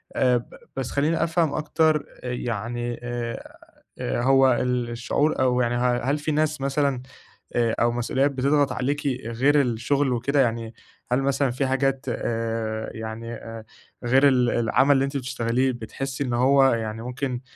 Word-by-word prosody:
آآ 125 -1 +3
ب 120 - -9 0.2
بس 135 -2 -3
خلّيني 155 +4 +1
أفهم 165 -2 +1
أكتر 155 0 +1 0.2
آآ 125 - -3
يعني 120 +1 -3
آآ 120 -1 -4 0.6
آآ - - -1
هو 135 0 +5
ال 125 0 -1
الشعور 120 +6 0
أو 125 -1 +2
يعني 120 0 0
ه 120 0 +1
هل 145 - +1
في 150 +1 -2
ناس 155 -1 0
مثلًا 140 -1 0 0.5
آآ 115 -2 +2
أو 120 0 +3
مسؤوليات 130 +4 0
بتضغط 140 +1 +2
عليكِ 145 +3 -2 0.2
غير 135 +6 +3
الشغل 130 +2 0
وكده؟ 140 +4 +1
يعني 115 -2 -1 0.4
هل 125 +2 +2
مثلًا 135 -1 +1
في 130 +2 -1
حاجات 135 0 0
آآ 115 -2 -2
يعني 110 +1 -6
آآ 115 -1 -8 0.4
غير 135 +4 +5
ال 125 -3 +3
العمل 120 +4 +2
اللي 135 0 +2
أنتِ 140 +1 -3
بتشتغليه 130 0 0
بتحسي 130 +4 -5
إن 125 - -2
هو 135 +3 +4
يعني 110 -1 -3
ممكن 125 0 -3
125 Hz, 160 wpm, -24 LUFS, 120-140 Hz, 0.6 s, هو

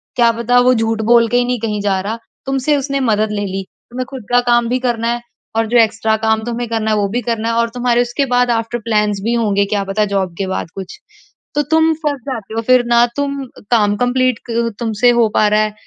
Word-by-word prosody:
क्या 235 -1 +4
पता 245 +1 +3
वो 255 - +6
झूठ 225 -1 0
बोल 235 -1 +6
के 245 - +2
ही 245 - +2
नहीं 245 -1 -1
कहीं 210 -2 -2
जा 195 -2 0
रहा 215 +4 -4 0.3
तुमसे 270 +2 +1
उसने 275 0 -2
मदद 215 0 +1
ले 205 -1 -2
ली। 195 0 -4 0.3
तुम्हें 255 +1 -4
ख़ुद 260 -4 -7
का 245 - +5
काम 240 0 +3
भी 250 +1 0
करना 240 -2 -1
है 240 - -5 0.4
और 225 - +2
जो 240 +2 +2
एक्स्ट्रा 225 -1 +2
काम 220 0 0
तुम्हें 240 0 -3
करना 220 -1 -1
है 215 - +2
वो 205 - +1
भी 245 +4 -2
करना 230 -1 -2
है - - 0
और 235 - +1
तुम्हारे 245 -1 +2
उसके 245 +3 -1
बाद 245 0 +3
आफ्टर 230 +1 -1
प्लान्स 210 -2 0
भी 230 - 0
होंगे 205 -4 +1
क्या 200 0 -1
पता 195 +2 0
जॉब 190 -3 -1
के 195 - -2
बाद 190 - -3
कुछ। 190 -1 -8 0.6
तो 295 - +3
तुम 320 0 +4
फँस 300 -3 -3
जाते 225 -6 -5
हो 225 - 0
फ़िर 255 -1 +5
ना 235 0 +5
तुम 280 0 -1 0.3
काम 210 -3 +3
कंप्लीट 250 -1 +1
क 230 0 0
तुमसे 230 0 +2
हो 230 - +4
पा 210 - +4
रहा 210 0 +3
है 215 -1 -1
230 Hz, 240 wpm, -17 LUFS, 215-245 Hz, 0.6 s, वो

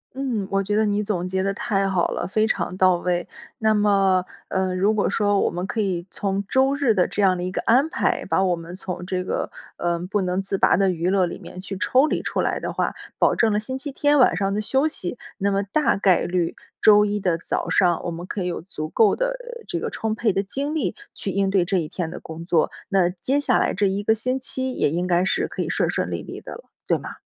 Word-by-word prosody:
嗯， 250 -7 -2
我 195 0 +2
觉 205 +2 -1
得 215 0 +3
你 205 0 +1
总 200 -4 -2
结 190 +1 -1
得 195 +1 0
太 195 -1 0
好 185 -3 +1
了， 175 - -3
非 215 +3 +2
常 185 - -1
到 185 -1 +4
位。 175 0 -1 0.3
那 220 -1 +3
么， 195 -3 +3 0.2
呃， 190 -1 0
如 200 +4 +2
果 210 - +1
说 205 -2 +2
我 - - +2
们 175 +1 -4
可 220 +3 -4
以 185 -4 -1
从 200 0 -2
周 265 +1 +3
日 275 -6 +2
的 185 -3 +2
这 205 - -2
样 185 -2 +4
的 175 - -4
一 180 - -2
个 - - -2
安 260 +7 +4
排， 350 - 0
把 190 - +1
我 180 -2 +1
们 170 +2 -8
从 180 -1 -6
这 185 0 -2
个， - - -2 0.3
呃， 175 0 0
不 205 - +2
能 185 +1 0
自 195 0 -2
拔 - - +4
的 195 -1 +3
娱 175 0 0
乐 190 -1 +3
里 175 - -6
面 185 - -9
去 195 0 -6
抽 260 +8 +3
离 - - -1
出 - - -1
来 - - 0
的 - - -4
话， - - -1 0.2
保 - - +3
证 225 -2 +3
了 210 - +2
星 260 +4 -4
期 285 +2 -6
天 290 0 +3
晚 245 - +5
上 195 +1 0
的 210 - 0
休 265 +7 +1
息。 245 - -3 0.2
那 200 -1 +1
么 200 0 +1
大 240 +10 +1
概 195 -2 +3
率 175 -2 -1 0.2
周 210 -1 +7
一 205 0 -1
的 175 -3 +1
早 - - -3
上， 175 -3 +3
我 175 - -3
们 170 +1 -6
可 190 -1 -3
以 - - -2
有 175 - -3
足 155 -4 -6
够 215 +4 +4
的， - - 0
呃， - - -7
这 - - -3
个 - - -3
充 220 -1 -2
沛 220 -2 +1
的 195 - 0
精 280 +9 -3
力 305 - 0 0.2
去 195 - -4
应 195 0 +1
对 195 -2 +3
这 190 +2 0
一 160 -3 -1
天 165 0 -4
的 180 - -7
工 160 +1 -8
作。 170 -2 +2 0.2
那 190 -3 +3
接 255 +10 0
下 290 - +2
来 - - +1
这 205 - +1
一 195 +2 -1
个 220 - +4
星 255 +4 -1
期 260 0 -3
也 - - +1
应 175 +4 -1
该 175 0 +3
是 190 - 0
可 - - -5
以 - - -2
顺 - - +1
顺 - - -1
利 - - -3
利 - - -8
的 - - -10
了， - - -11 0.2
对 - - +2
吗？ - - -8
195 Hz, 280 characters per minute, -23 LUFS, 180-220 Hz, 0.3 s, 周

